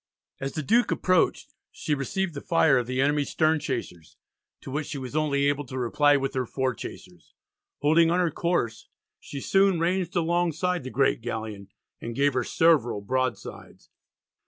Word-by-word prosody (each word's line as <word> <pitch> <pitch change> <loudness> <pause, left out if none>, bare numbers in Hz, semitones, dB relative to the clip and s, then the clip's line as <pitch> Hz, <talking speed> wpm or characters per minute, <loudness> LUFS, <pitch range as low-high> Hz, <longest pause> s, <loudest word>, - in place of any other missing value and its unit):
As 135 0 -4
the 155 - -3
Duke 235 - +3
approached 185 -2 +1 0.2
she 150 - -3
received 165 +6 -2
the 140 - -6
fire 160 -6 +3
of 120 - -4
the 130 +1 -2
enemy's 145 +1 +1
stern 160 0 +2
chasers, 115 - -6 0.4
to - - -9
which 145 +2 -3
she 145 - -5
was 130 +1 -7
only 145 -2 +1
able 145 0 +1
to 130 +1 -7
reply 145 +4 +3
with 135 0 -2
her 130 -2 -2
fore 130 0 -1
chasers. 90 -5 -11 0.5
Holding 160 +3 +4
on 175 +2 +2
her 175 -3 +1
course 145 -10 -2 0.3
she 140 - -8
soon 195 +3 +2
ranged 180 +1 -1
alongside 175 0 0
the 130 - -6
great 135 0 +1
galleon, 110 -4 -5 0.3
and 115 0 -6
gave 140 +1 +2
her 125 -1 0
several 145 -11 +2
broadsides. 130 +4 -4
145 Hz, 170 wpm, -26 LUFS, 130-165 Hz, 0.5 s, Holding